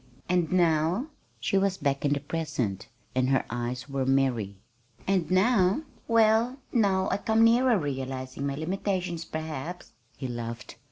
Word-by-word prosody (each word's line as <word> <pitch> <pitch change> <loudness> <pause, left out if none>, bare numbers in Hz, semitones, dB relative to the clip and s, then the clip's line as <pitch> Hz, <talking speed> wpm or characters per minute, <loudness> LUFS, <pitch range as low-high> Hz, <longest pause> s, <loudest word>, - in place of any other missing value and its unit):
"And 180 -3 +1
now?" 175 - +2 0.3
She 195 - +1
was 195 -1 +1
back 140 -1 -1
in 145 -1 +2
the 145 - 0
present, 135 - -3 0.3
and 130 0 +1
her 135 - +2
eyes 120 +2 -3
were 135 -1 -2
merry. 130 -7 +1 0.5
"And 185 -5 +1
now? 190 +4 +3 0.2
Well, 230 +2 +3 0.2
now 195 -5 +2
I - - +2
come 220 +2 +2
nearer 235 +1 +5
realizing 135 -3 -4
my 140 - -2
limitations, 180 +1 -2
perhaps," 160 +2 -6 0.3
he 130 - -4
laughed. 120 0 -6
160 Hz, 145 wpm, -28 LUFS, 135-195 Hz, 0.5 s, nearer